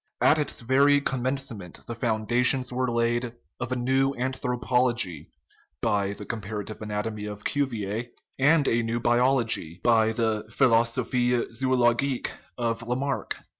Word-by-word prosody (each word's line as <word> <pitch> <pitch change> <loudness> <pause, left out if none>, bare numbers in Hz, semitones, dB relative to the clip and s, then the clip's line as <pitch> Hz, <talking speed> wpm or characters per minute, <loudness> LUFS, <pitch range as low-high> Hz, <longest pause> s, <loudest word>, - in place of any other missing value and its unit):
At 155 - +4
its 150 - -2
very 140 +4 +4
commencement 130 -8 -3
the 120 - -5
foundations 120 +3 +1
were 130 0 0
laid 120 0 0 0.2
of 120 +1 -4
a - - +1
new 135 +2 +1
anthropology 125 - 0 0.5
(by 100 -3 0
the 105 - -9
comparative 105 -1 -5
anatomy 105 0 -3
of 105 0 -7
Cuvier) 115 -5 -2 0.3
and 145 +2 +4
of - - +3
a 115 - +2
new 115 +1 -2
biology 120 -8 +1
(by 110 -2 +4
the 110 -2 -1
Philosophic 120 0 +2
Zoologique 125 +1 +1 0.3
of 115 -1 -1
Lamarck). 130 +4 -2
120 Hz, 130 wpm, -26 LUFS, 110-130 Hz, 0.5 s, At